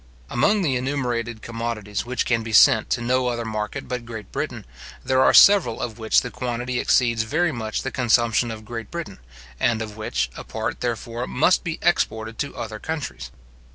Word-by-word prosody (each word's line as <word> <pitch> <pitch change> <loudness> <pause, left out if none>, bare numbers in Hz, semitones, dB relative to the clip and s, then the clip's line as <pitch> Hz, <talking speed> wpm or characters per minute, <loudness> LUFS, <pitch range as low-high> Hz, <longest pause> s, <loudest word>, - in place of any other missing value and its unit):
Among 205 - +2
the 140 -6 +1
enumerated 125 -4 -2
commodities 115 -2 -4
which 125 -1 -1
can 115 -1 +1
be 110 0 -6
sent 110 +1 +6
to 120 - 0
no 125 +1 +1
other 120 -1 -2
market 110 +5 -4
but 125 -2 -4
Great 115 -3 -9
Britain, - - -4 0.4
there 130 +1 +3
are - - +6
several 195 - +6
of 115 -1 -5
which 110 -1 +3
the 125 - -6
quantity 125 0 -3
exceeds 115 -3 +2
very 155 +9 0
much 110 -5 -3
the 130 - -3
consumption 120 -2 +2
of 110 -1 -7
Great 115 -1 -6
Britain, 170 - -6 0.4
and 115 -2 +2
of 110 -1 -6
which, 65 - -2
a - - -7
part, - - -4
therefore, 120 0 -3
must 165 +8 +2
be 165 -3 -3
exported 110 -9 0
to 145 - -3
other 110 -2 -5
countries. 65 - -5
120 Hz, 185 wpm, -23 LUFS, 110-130 Hz, 0.4 s, sent